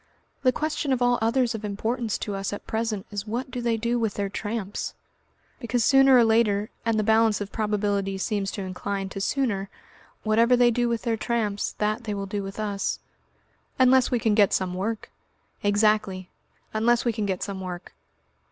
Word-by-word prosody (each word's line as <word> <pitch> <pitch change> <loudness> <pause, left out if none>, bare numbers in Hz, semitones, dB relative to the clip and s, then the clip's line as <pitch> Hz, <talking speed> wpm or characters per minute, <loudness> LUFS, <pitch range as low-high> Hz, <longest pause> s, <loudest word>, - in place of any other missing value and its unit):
The 255 -2 +4
question 305 0 -2
of 250 -1 +1
all 245 0 +3
others 235 +2 +2
of 220 -1 -6
importance 220 +2 -2
to 205 - -4
us 195 0 -3
at 205 - -6
present 220 -2 -2
is 205 +1 -4
what 245 +4 -3
do 245 -1 -4
they 235 -1 +1
do 235 +2 0
with 220 -3 -1
their 200 -1 -2
tramps? 205 0 -4 0.6
Because 235 -2 0
sooner 270 -1 +6
or 240 - +6
later, 220 -2 +2
and 230 -1 +1
the 215 - +2
balance 220 0 +3
of 205 -1 -5
probability 205 -2 -1
seems 200 0 -1
to 200 - -4
incline 195 +1 -4
to 195 - -6
sooner, 200 -5 -1 0.5
whatever 230 +3 +4
they 240 -1 +5
do 240 +1 +1
with 235 -1 -2
their 230 -2 0
tramps 215 -3 -1
that 215 +3 -1
they 210 -2 -2
will 200 0 -3
do 200 +1 -3
with 195 +1 -7
us." 205 -2 -1 0.8
"Unless 260 0 +5
we 245 - +1
can 220 -2 +1
get 205 -2 +4
some 185 -1 0
work." 210 +4 -3 0.5
"Exactly 205 -2 +1 0.4
unless 235 +3 +2
we 235 - +2
can 215 -2 -2
get 190 -2 -2
some 195 -2 -5
work." 180 -1 -7
215 Hz, 190 wpm, -25 LUFS, 200-235 Hz, 0.8 s, sooner